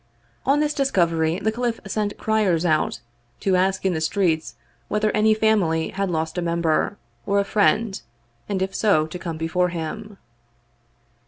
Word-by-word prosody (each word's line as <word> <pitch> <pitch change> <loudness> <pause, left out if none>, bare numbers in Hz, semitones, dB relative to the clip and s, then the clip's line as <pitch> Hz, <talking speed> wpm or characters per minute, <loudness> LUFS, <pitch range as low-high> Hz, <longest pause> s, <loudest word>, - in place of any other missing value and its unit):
On 285 +2 +4
this 300 0 +1
discovery 170 - +1
the 215 +3 0
caliph 235 0 -2
sent 205 +1 -2
criers 200 -6 +1
out, 155 -6 +1 0.4
to 190 -2 +2
ask 190 +1 +1
in 190 - +2
the 160 - -2
streets 160 -1 0 0.3
whether 210 0 +1
any 215 +1 +3
family 200 -7 +2
had 195 -2 -2
lost 160 +1 -2
a - - -1
member, 170 +3 0 0.3
or 200 - +2
a - - +2
friend, 210 0 +1 0.5
and 190 -2 0
if 190 0 -4
so, 200 -8 +3
to 160 +3 -8
come 170 -2 -5
before 170 +3 0
him. 185 +5 -6
190 Hz, 160 wpm, -23 LUFS, 165-215 Hz, 0.5 s, On